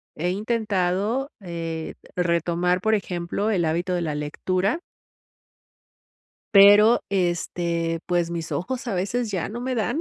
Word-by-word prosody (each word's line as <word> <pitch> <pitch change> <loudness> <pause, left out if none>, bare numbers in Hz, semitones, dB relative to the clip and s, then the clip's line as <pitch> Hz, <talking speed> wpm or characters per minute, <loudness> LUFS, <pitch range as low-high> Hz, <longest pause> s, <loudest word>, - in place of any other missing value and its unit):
he 175 +3 -1
intentado, 210 +3 0
eh, 165 -3 -5 0.2
retomar, 175 +1 +1
por 220 +2 +2
ejemplo, 185 +2 -2
el 185 -5 +1
hábito 175 +3 -1
de 175 - 0
la 155 -3 -2
lectura 185 - -1 1.8
pero, 205 +3 +8
este, 170 -2 -1
pues 175 -1 0
mis 165 -2 -4
ojos, 240 - -3
a 230 - -2
veces, 210 +5 -1
ya 185 -4 -2
no 235 +3 -6
me 255 +1 -2
dan. 235 +7 -1
180 Hz, 130 wpm, -24 LUFS, 170-210 Hz, 1.8 s, pero